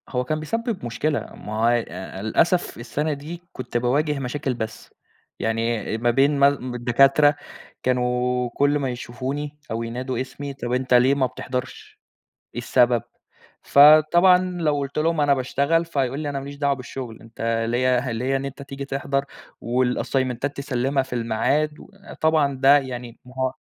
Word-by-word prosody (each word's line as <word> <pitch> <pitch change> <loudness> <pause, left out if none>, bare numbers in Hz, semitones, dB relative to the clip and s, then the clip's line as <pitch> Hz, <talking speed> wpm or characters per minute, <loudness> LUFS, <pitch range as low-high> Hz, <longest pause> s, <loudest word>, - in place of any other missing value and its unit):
هو 125 -1 -1
كان 155 +4 -2
بيسبب 225 - -3
مشكلة، 145 +5 -1 0.2
ما 105 - -8
هو 115 - +5
ي 120 0 +3 0.4
للأسف 170 - +1
السنة 145 +6 -2
دي 155 +5 -8
كُنت 125 -1 -4
باواجه 140 +5 +1
مشاكل 135 +1 -2
بس، 110 -2 -7 0.5
يعني 115 -1 -1
ما 120 +1 +2
بين 140 +3 +3
مال 140 -3 +2
الدكاترة 135 +5 +4 0.5
كانوا 125 0 0
كل 145 +4 +1
ما 135 -2 -1
يشوفوني 135 +4 -5
أو 115 +1 -2
ينادوا 125 +2 -3
اسمي، 140 +2 -6
طب 125 -3 -4
أنت 130 0 0
ليه 125 +3 +5
ما 135 -2 +2
بتحضرش، 125 0 -6 0.6
إيه 120 - -3
السبب؟ 120 -1 +3 0.6
فطبعًا 155 +5 +7 0.2
لو 150 -2 +1
قُلت 140 0 -5
لهم 160 0 +1
أنا 145 -1 +4
باشتغل، 140 +5 +1
فيقول 135 -4 -1
لي 150 -1 -3
أنا 140 -1 -3
ما 135 - -8
ليش 140 0 -8
دعوة 140 0 +1
بالشغل 125 -3 -8
أنت 115 0 -2
ليَّ 125 +1 +1
ليَّ 130 +4 -1
إن 135 - -4
أنت 140 +1 -7
تيجي 140 0 -7
تحضر 140 0 -2 0.4
والأسيمنتات 130 +2 -1
تسلِّمها 135 0 0
في 130 - -9
الميعاد 125 +6 0 0.5
طبعًا 155 -3 +3
ده 135 +2 +6
يعني 125 -4 -6
ما 125 - -14
هو 130 0 0
130 Hz, 155 wpm, -23 LUFS, 125-145 Hz, 0.6 s, فطبعًا